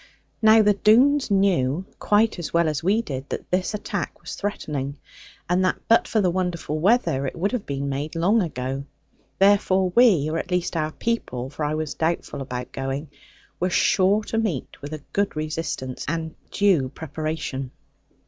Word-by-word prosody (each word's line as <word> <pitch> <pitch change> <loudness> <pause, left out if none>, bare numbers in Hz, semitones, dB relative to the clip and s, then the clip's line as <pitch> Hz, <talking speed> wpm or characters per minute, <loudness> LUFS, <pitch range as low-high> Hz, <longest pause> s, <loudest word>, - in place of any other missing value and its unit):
Now 220 0 +7
the 210 0 +5
Doones 245 +9 +4
knew, 185 -5 +2
quite 210 -1 +2
as 170 - -4
well 170 -1 +3
as 150 -3 -1
we 210 +6 +2
did, 135 - -6
that - - -6
this 185 +3 0
attack 210 - -4
was - - -8
threatening; 145 -8 -3 0.5
and 180 +2 +2
that 185 - +1
but 230 - +4
for 220 - +1
the 180 -2 +2
wonderful 175 -4 -2
weather 175 - +2
it - - -5
would 185 +4 0
have 250 -5 -3
been 140 0 -3
made 140 +4 -3
long 195 +7 +3
ago. 135 -4 -3 0.5
Therefore 190 -2 +3
we, 205 - +5
or 160 +1 -1
at 180 - -6
least 180 -1 -1
our 155 -1 0
people 135 - -3
(for 150 - -5
I 150 +1 0
was 155 -2 -3
doubtful 160 -3 -2
about 125 -2 -5
going), 135 +3 -4 0.5
were 180 - +1
sure 195 +3 +3
to 225 - -2
meet 190 - -3
with 145 +2 -7
a 155 -2 -7
good 200 -3 0
resistance, 155 -4 -4
and 160 +1 -2 0.2
due 185 -10 +2
preparation. 155 -3 -4
170 Hz, 175 wpm, -24 LUFS, 145-200 Hz, 0.5 s, Now